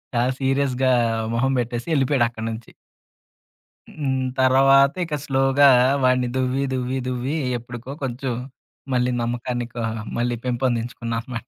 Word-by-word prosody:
చాలా 120 +2 +2
సీరియస్‌గా, 135 -1 +1 0.4
మొహం 125 +3 +1
పెట్టేసి 120 +2 -3
ఎళ్ళిపోయాడు 135 -2 +2
అక్కడి 110 -1 -7
నుంచి. 110 +1 -9 1.2
హ్మ్. 135 -3 -1 0.2
తర్వాత 135 +1 +5
ఇక 160 -2 -3
స్లోగా 135 +1 +4 0.4
వాడిని 125 -1 +3
దువ్వి, 130 +1 0
దువ్వి, 130 +1 -2
దువ్వి 125 +3 -2 0.2
ఎప్పడికో 120 +1 -9
కొంచెం 130 0 -3 0.6
మళ్ళీ 125 0 +1
నమ్మకాన్ని 120 0 -3
కా 120 - -3 0.3
మళ్ళీ 120 0 0
పెంపొందించుకున్నా 120 -2 -2
అనమాట. 120 -1 -7
125 Hz, 120 wpm, -22 LUFS, 120-135 Hz, 1.2 s, తర్వాత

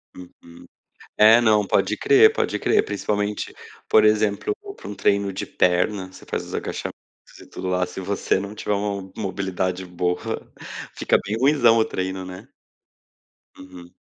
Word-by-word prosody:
Uhum. 85 -1 -14 0.5
É, 110 +2 +7
não, 105 -3 +3
pode - - +1
crer, 420 +1 +6
pode - - -1
crer, 425 0 +2
principalmente, 105 - -2 0.3
por 110 - +5
exemplo, 105 - +2 0.2
para - - -12
um 105 - -6
treino 100 -1 +1
de 95 - -5
perna, 95 +1 0
você - - -14
faz - - -3
os - - -11
agachamentos - - -4 0.5
e - - -13
tudo 95 - -6
lá, 90 0 +1
se 90 - -10
você 95 0 0
não 100 +2 -6
tiver 105 - -2
uma 100 -2 -3
mobilidade 95 -2 -3
boa, 90 0 -1 0.8
fica - - +2
bem 105 +2 -2
ruinzão 125 -4 +4
o 110 - +4
treino, 95 0 -4
né. 90 0 -10 1.1
Uhum. 90 -1 -13
100 Hz, 155 wpm, -23 LUFS, 95-110 Hz, 1.1 s, É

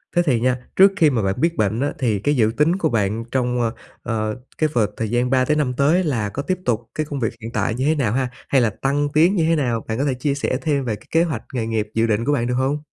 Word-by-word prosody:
Thế 175 - +5
thì 130 -7 +2
nha, 125 +2 +1 0.2
trước 195 +1 +7
khi 160 -3 +5
mà 125 -5 0
bạn 95 +6 -1
biết 170 0 +2
bệnh 110 +1 +1
á 145 - 0
thì 110 -6 +1
cái 145 +8 +1
dự 110 -3 +3
tính 160 +4 +3
của 195 - 0
bạn 110 0 0
trong, 125 -2 0
ờ, 115 0 0 0.3
ờ, 110 -1 -2 0.2
cái 155 - +1
vợt 110 -4 +2
thời 110 - -2
gian 120 +2 +1
3 130 -1 +3
tới 150 +3 +1
5 135 -4 0
tới 150 +8 +2
là 115 - -1
có 140 - -4
tiếp 185 +5 -1
tục 115 -1 -1
cái 155 - -1
công 145 -2 -5
việc 115 -4 -1
hiện 115 - -6
tại 110 0 -1
như 130 +3 -1
thế 155 - +3
nào 125 -8 0
ha? 130 0 0 0.2
Hay 135 -2 +4
là 115 - +3
tăng 145 +2 +1
tiến 170 +6 +4
như 165 - +2
thế 165 - +3
nào, 120 -6 -1
bạn 110 +1 -2
có 140 - 0
thể 135 - +1
chia 135 +3 -1
sẻ 135 -2 -1
thêm 140 -4 0
về 110 - -1
cái 105 - -18
kế 165 +1 +4
hoạch 150 -10 -3
nghề 120 -3 -1
nghiệp 110 -1 -2
dự 115 0 +2
định 110 +1 0
của 145 - +1
bạn 120 -4 0
được 125 - -1
hông? 135 +4 0
125 Hz, 300 wpm, -21 LUFS, 115-145 Hz, 0.3 s, trước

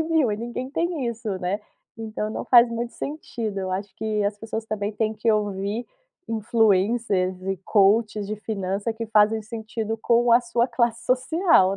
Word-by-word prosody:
100.000, 320 -7 +2
e 205 - -1
ninguém 240 +3 -5
tem 330 -3 -1
isso, 235 -1 -4
né, 185 +3 -2 0.4
então 215 -1 -4
não - - -4
faz 240 -1 +7
muito 235 +1 -4
sentido. 230 -8 -5
Eu 190 -1 -3
acho 195 +1 -4
que 215 -1 -1
as 205 0 -1
pessoas 225 +1 -5
também 210 -1 -2
têm 215 +1 0
que 225 +1 +1
ouvir 205 +2 -1 0.4
influencers 210 -3 +1
e 195 0 -2
coaches 210 0 +3
de 215 +1 -4
finança 200 0 -3
que 225 0 -5
fazem 215 0 +3
sentido 220 0 -4
com 235 +1 +3
a 235 - +7
sua 235 0 +1
classe 235 -1 0
social, 255 - +3
220 Hz, 170 wpm, -24 LUFS, 205-235 Hz, 0.4 s, faz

